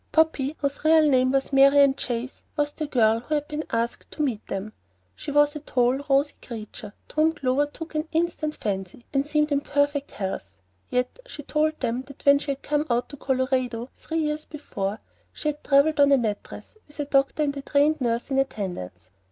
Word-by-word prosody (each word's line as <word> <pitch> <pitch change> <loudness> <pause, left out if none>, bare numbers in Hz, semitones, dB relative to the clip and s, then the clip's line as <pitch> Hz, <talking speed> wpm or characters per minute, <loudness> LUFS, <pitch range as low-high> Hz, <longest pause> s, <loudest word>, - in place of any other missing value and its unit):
"Poppy," 315 -3 +2
whose 280 0 -3
real 315 0 +6
name 255 -2 +3
was 270 +1 0
Marian 275 0 +6
Chase, 245 -1 -4 0.2
was 295 0 +1
the 305 0 -4
girl 225 -4 +3
who 275 +6 -2
had 295 0 -1
been 300 +1 -3
asked 230 +1 -2
to 305 - -3
meet 240 -7 -2
them. 195 +2 -4 0.4
She - - -7
was 290 +1 +3
a - - -4
tall, 250 -3 +1
rosy 280 +2 +3
creature, 215 -2 -8
to - - -15
whom 315 +1 +4
Clover 275 +1 +1
took 320 +3 -9
an 310 +1 -2
instant 320 -2 -1
fancy, 195 +2 -4
and 275 +1 +1
seemed 300 0 +1
in 285 0 +2
perfect 285 0 0
health; 190 - -5 0.3
yet 250 - -1
she 295 - -9
told 310 +2 0
them 240 0 -1
that 280 - -14
when 280 0 +7
she 280 -1 -2
came 295 +2 -1
out 240 0 0
to 285 - -9
Colorado 255 -2 -1
three 325 - -5
years 305 -1 -1
before, 210 -9 -4 0.3
she 305 - -3
had 295 0 -5
travelled 285 +2 +4
on 285 0 +6
a 275 - +7
mattress, 220 - -4
with 295 0 -13
a 290 - 0
doctor 275 +2 +2
and 285 -1 -1
a - - -4
trained 290 +2 +2
nurse 235 +2 -1
in 270 - +2
attendance. 175 - -4
280 Hz, 200 wpm, -25 LUFS, 245-300 Hz, 0.4 s, when